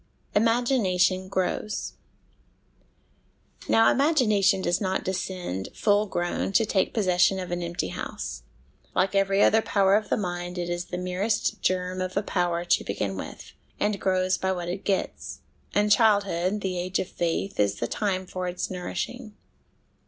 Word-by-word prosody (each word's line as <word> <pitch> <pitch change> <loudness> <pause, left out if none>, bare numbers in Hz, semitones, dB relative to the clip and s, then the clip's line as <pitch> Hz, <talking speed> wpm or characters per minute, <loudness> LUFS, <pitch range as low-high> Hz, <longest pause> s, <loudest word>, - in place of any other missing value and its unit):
Imagination 205 -5 +2
Grows. 190 +3 -2 1.8
Now 225 0 +5
imagination 215 - +3
does 175 +3 +1
not 190 -1 -1
descend, 180 - -3
full 205 0 +2
grown, 175 +1 -2
to 225 +3 +4
take 195 -3 +1
possession 185 -3 +3
of 180 -1 -5
an 175 0 -2
empty 170 0 -3
house; 65 -3 -5 0.5
like 190 +1 +2
every 195 0 +3
other 220 - +5
power 195 -3 +2
of 215 0 0
the - - +2
mind, 175 -2 -4
it 175 0 -2
is 175 0 -2
the 180 - -5
merest 190 +4 -1
germ 185 0 0
of 185 +1 -3
a 200 - +1
power 175 -3 -1
to - - +2
begin 100 0 -3
with, 95 - -8 0.3
and 205 -1 0
grows 185 -1 +1
by 190 - 0
what 175 -2 -3
it 190 +3 -4
gets; 195 -2 -2 0.3
and 210 0 +2
childhood, 200 -3 +3
the 185 -2 -2
age 180 +1 -1
of - - -2
faith, 175 +3 -2
is 100 -1 +2
the 120 - -2
time 190 - -1
for 185 0 -4
its 180 +1 -3
nourishing. 215 +5 -5
185 Hz, 155 wpm, -26 LUFS, 180-205 Hz, 1.8 s, Now